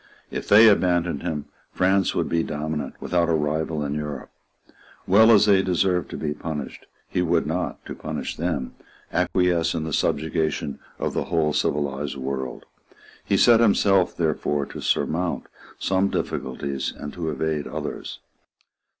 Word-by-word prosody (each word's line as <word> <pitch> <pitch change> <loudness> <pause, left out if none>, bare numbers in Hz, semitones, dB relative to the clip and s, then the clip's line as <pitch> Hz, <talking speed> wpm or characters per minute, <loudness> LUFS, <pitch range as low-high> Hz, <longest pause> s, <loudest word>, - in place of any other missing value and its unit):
If - - -5
they 110 +2 +8
abandoned 90 -6 +2
him, 75 -5 -3 0.3
France 95 +1 +2
would - - 0
be 85 - +1
dominant 75 -2 -4
without 85 -1 +1
a 85 - +3
rival 75 0 -1
in 70 - -2
Europe. 75 -2 -5 0.7
Well 110 +4 +6
as 105 -2 +7
they 100 -2 +5
deserved 90 -1 +1
to - - -6
be 75 -1 -2
punished, 75 -2 -6 0.2
he 90 - -1
would 85 -1 +2
not, 90 +4 -3
to - - -6
punish - - -5
them, 80 -6 -2 0.4
acquiesce 85 -3 +1
in 80 - -2
the 80 -1 -4
subjugation 75 -3 -1 0.2
of - - -2
the - - -1
whole 80 -3 +1
civilised 70 -1 -1
world. 65 -1 -4 0.6
He 100 - +1
set 115 +3 +6
himself 100 -4 +3
therefore 75 -3 0
to - - -9
surmount 85 +2 0 0.3
some 95 +1 +1
difficulties 70 +1 -3
and 75 - -7
to 85 -2 -3
evade 75 0 -2
others. - - -5
80 Hz, 150 wpm, -24 LUFS, 75-90 Hz, 0.7 s, they